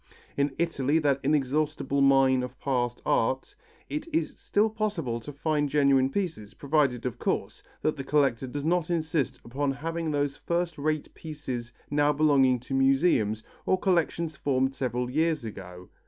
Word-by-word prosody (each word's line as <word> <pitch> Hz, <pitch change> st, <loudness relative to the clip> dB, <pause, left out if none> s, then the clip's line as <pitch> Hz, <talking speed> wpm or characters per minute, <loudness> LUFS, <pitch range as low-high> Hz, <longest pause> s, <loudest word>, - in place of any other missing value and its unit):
In 140 Hz, -1 st, 0 dB
Italy, 160 Hz, -3 st, +1 dB
that 140 Hz, -4 st, +2 dB
inexhaustible 140 Hz, 0 st, 0 dB
mine 135 Hz, -1 st, +5 dB
of 125 Hz, 0 st, -7 dB
past 120 Hz, -3 st, -1 dB
art, 130 Hz, -, 0 dB, 0.3 s
it 300 Hz, +2 st, -4 dB
is 325 Hz, +1 st, 0 dB
still 210 Hz, +2 st, +1 dB
possible 205 Hz, -, -2 dB
to 130 Hz, +6 st, -8 dB
find 145 Hz, 0 st, 0 dB
genuine 140 Hz, -2 st, +3 dB
pieces, 155 Hz, -, -4 dB
provided, 140 Hz, -4 st, +1 dB
of 125 Hz, -, -3 dB
course, -, -, -2 dB, 0.2 s
that 155 Hz, -, +1 dB
the 135 Hz, -, -4 dB
collector 135 Hz, -3 st, +1 dB
does 145 Hz, +3 st, -5 dB
not 170 Hz, 0 st, +1 dB
insist 160 Hz, -5 st, -1 dB
upon 135 Hz, +4 st, -1 dB
having 165 Hz, +3 st, -3 dB
those 145 Hz, -2 st, -1 dB
first 170 Hz, -2 st, -2 dB
rate 155 Hz, +1 st, -1 dB
pieces 130 Hz, -7 st, -6 dB, 0.2 s
now 145 Hz, 0 st, +3 dB
belonging 140 Hz, -4 st, +3 dB
to 135 Hz, -, -7 dB
museums 135 Hz, -5 st, +2 dB, 0.2 s
or 185 Hz, -, +3 dB
collections 170 Hz, -4 st, 0 dB
formed 135 Hz, -1 st, 0 dB
several 125 Hz, -2 st, -2 dB
years 155 Hz, 0 st, 0 dB
ago. 90 Hz, -4 st, -9 dB
140 Hz, 155 wpm, -27 LUFS, 130-155 Hz, 0.3 s, mine